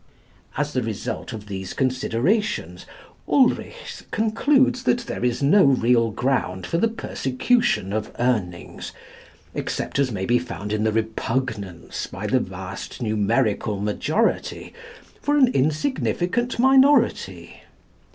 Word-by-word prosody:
As - - -1
the - - +1
result - - -4
of 105 -2 -7
these 95 -2 -6
considerations, 130 - 0 0.4
Ulrichs 290 - +1
concludes 255 +4 +2
that 245 -1 +1
there 235 - -5
is 125 +2 0
no 190 +9 +6
real 120 -4 +3
ground 110 -5 -1
for 170 - -1
the 230 - +3
persecution 225 - 0
of 110 +1 -2
Urnings 105 -8 -2 0.6
except - - -3
as 135 -3 +2
may 95 -3 -3
be 120 +3 +3
found 110 -4 -5
in 110 0 0
the 110 - +2
repugnance 110 -4 -3
by - - -7
the - - +2
vast - - -7
numerical 110 -1 0
majority 145 - -1 0.5
for 290 0 +1
an 260 -3 +6
insignificant 205 - 0
minority. 265 +3 +3
130 Hz, 120 wpm, -23 LUFS, -, 0.6 s, no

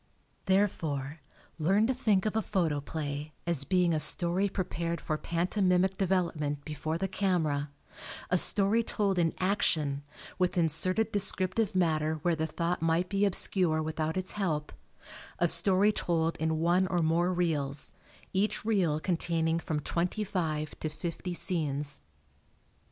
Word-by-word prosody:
Therefore, 160 -7 0 0.4
learn 195 +7 +3
to 260 - +1
think 215 -6 +1
of 215 - -1
a 220 - +2
photoplay 150 -4 -2
as 165 -5 +1
being 180 -1 +2
a 155 - +1
story 175 +5 +2
prepared 170 -3 -3
for 155 - -2
pantomimic 180 +3 +1
development 170 -7 -1
before 155 +1 -3
the 195 - -1
camera; 165 -7 0 0.6
a 180 - +4
story 205 +5 +4
told 200 -4 0
in 165 -2 +2
action, 155 -7 0 0.4
with 180 0 +1
inserted 185 +7 +2
descriptive 195 +1 -1
matter 160 -3 +1
where 175 -1 +2
the 160 0 -1
thought 170 +2 -2
might 165 +2 +1
be 200 0 +2
obscure 180 -4 +2
without 155 +1 -2
its 185 0 -2
help; 160 -7 -2 0.6
a 175 - +3
story 195 +4 +4
told 165 -4 0
in 160 0 0
one 175 +3 +2
or 175 -2 0
more 170 +3 +2
reels, 150 -6 -1 0.4
each 210 +3 0
reel 185 -9 +1
containing 165 -1 0
from 160 -2 -2
twenty 175 +8 -1
five 155 -6 -2
to 155 - -2
fifty 170 +3 -5
scenes. 145 -6 -2
170 Hz, 140 wpm, -30 LUFS, 155-190 Hz, 0.6 s, a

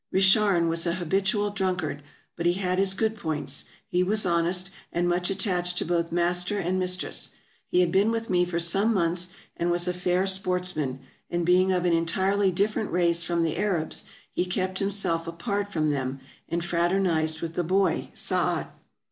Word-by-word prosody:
Richarn 190 -2 +4
was 165 +1 -1
an 170 - +1
habitual 195 +3 0
drunkard, 180 -7 -2 0.3
but 170 0 -1
he 175 - +4
had 185 0 -1
his 195 0 +3
good 220 +2 0
points; 150 -7 -2 0.2
he 180 - +1
was 210 +4 +1
honest, 180 +2 +1 0.2
and 175 +1 0
much 175 0 +1
attached 180 -2 0
to - - +1
both 170 -1 0
master 175 +3 +1
and 185 0 0
mis 180 0 +1
tress. - - -3 0.4
He 180 - +3
had 175 -2 +2
been 195 +4 +3
with 230 0 -2
me 180 -1 +2
for 175 -1 -2
some 195 +7 +2
months, 175 0 +1 0.3
and 170 - -1
was 175 0 +1
a 180 - +1
fair 180 +1 +1
sportsman, 180 -8 0 0.3
and 175 0 -1
being 185 +2 +4
of 180 -1 +1
an 175 - +3
entirely 190 +4 +2
different 205 +3 0
race 170 -1 +2
from 170 0 0
the 160 -2 -1
Arabs, 185 -6 -1 0.3
he - - 0
kept 185 +1 -2
himself 195 -5 -1
apart 200 +4 -3
from 155 -4 +1
them, 135 -1 -2 0.3
and 170 +1 -2
fraternized 170 -3 +1
with 165 -1 -4
the 175 - -1
boy 190 +3 +1
Saat. - - 0
180 Hz, 180 wpm, -26 LUFS, 170-190 Hz, 0.4 s, Richarn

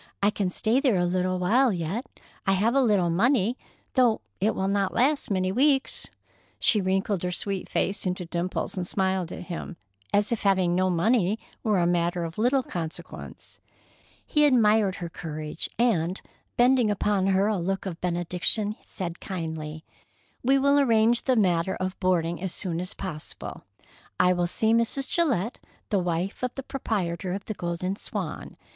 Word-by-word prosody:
"I 205 - +5
can 200 -3 -1
stay 220 +7 +2
there 265 -6 +2
a 175 - +2
little 185 +1 0
while 235 +8 +3
yet. 185 - -3 0.4
I 195 - +4
have 215 +5 +2
a 275 - +4
little 200 -8 +3
money, 230 +4 +2 0.4
though 245 -4 +3 0.2
it 210 +4 +1
will 190 - -1
not 200 -1 0
last 280 +4 +2
many 185 -2 +1
weeks." 270 +4 +1 0.5
She 210 - +3
wrinkled 190 0 0
her 180 - -2
sweet 195 +2 -3
face 195 +1 -1
into 180 0 -2
dimples 175 +2 -3
and 180 -2 -3
smiled 190 -3 0
at - - -6
him, 175 0 -6 0.3
as 205 +2 +2
if 235 - -1
having 190 -3 +3
no 185 +1 +2
money 200 +3 +2 0.2
were 215 -3 +1
a 175 - +3
matter 175 0 +1
of 165 +3 -6
little 255 +4 +3
consequence. 165 -7 -7 0.7
He 300 - +2
admired 215 -7 +4
her 175 - -5
courage, 155 -1 -5
and, 190 -7 +1 0.4
bending 245 -2 +4
upon 205 -1 +1
her 195 +1 +3
a 210 -2 +1
look 190 +3 -2
of 180 -3 -5
benediction, 180 +4 0
said 175 -3 -5
kindly: 160 -3 -5 0.6
"We 270 +2 +4
will 280 +1 +4
arrange 230 -3 +3
the 260 - +3
matter 185 -4 +2
of 185 0 -4
boarding 175 -2 +1
as 185 -2 -4
soon 175 -3 -2
as 180 - -6
possible. 155 -6 -7 0.5
I 180 0 +5
will 175 -1 0
see 220 +5 +1
Mrs. 230 +4 0
Gillette, 245 - +1 0.3
the 205 - +2
wife 175 +2 -2
of 250 -1 -2
the 270 - -5
proprietor 185 -9 -2
of 195 - -5
the 215 - -3
Golden 175 +1 -3
Swan. - - -6
190 Hz, 170 wpm, -26 LUFS, 175-225 Hz, 0.7 s, I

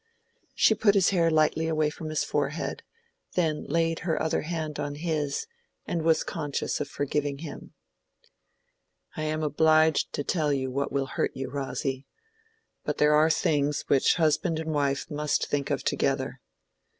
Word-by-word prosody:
She - - +5
put 210 -1 +3
his 195 -1 +4
hair 170 -3 +3
lightly 155 0 +2
away 155 -2 +1
from 155 +1 -7
his 155 - 0
forehead, 145 +2 -2 0.5
then 160 -4 0
laid 165 +1 +1
her 165 -2 -1
other 160 - 0
hand 155 -2 -4
on 145 0 -3
his, 150 -3 -2 0.4
and 170 - -2
was 160 0 +3
conscious 150 -4 -3
of 145 - -2
forgiving 145 0 -2
him. 150 0 -9 1.4
"I - - -4
am 155 0 -1
obliged 155 +1 +3
to 145 - -2
tell 155 -1 0
you 130 -2 -1
what 140 +2 -2
will 140 -1 0
hurt 135 - -2
you, 135 0 -4
Rosy. 135 -1 -3 0.8
But - - -2
there 150 0 +4
are 155 +2 +5
things 145 -2 +1
which 135 - +4
husband 165 +1 +1
and 160 0 -3
wife 140 -2 0
must 150 0 0
think 145 -1 -2
of - - -1
together. - - -1
155 Hz, 160 wpm, -27 LUFS, 145-160 Hz, 1.4 s, She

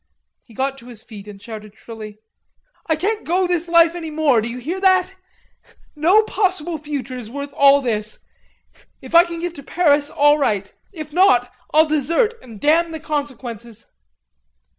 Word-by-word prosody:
He 230 - -20
got 270 +2 -2
to 235 - -15
his 235 -3 -10
feet 210 -3 -12
and 205 -1 -11
shouted 215 -1 -10
shrilly: 215 -2 -10 0.7
"I 320 - +2
can't 415 +7 -1
go 365 +3 +1
this 350 -1 -1
life 335 -1 +5
any 335 -2 -6
more, 300 -7 +2
do 220 - -4
you 235 +1 -6
hear 320 +10 -4
that? 375 -1 +3 0.8
No 355 +9 +4
possible 365 -6 -1
future 280 -3 -5
is 220 -3 -9
worth 280 +2 -7
all 280 0 +5
this. 215 -3 -3 0.8
If - - -13
I 340 +1 +7
can 340 -1 -6
get 350 -1 -3
to 285 - -10
Paris, 290 -1 +1
all 290 +1 +3
right. 205 -7 -1 0.2
If 310 -5 -9
not, 250 -10 +3 0.2
I'll 310 +1 +5
desert 320 - +1
and 225 -5 -12
damn 325 +5 +2
the 320 - -6
consequences." 245 -7 -6
290 Hz, 170 wpm, -20 LUFS, 240-335 Hz, 0.8 s, I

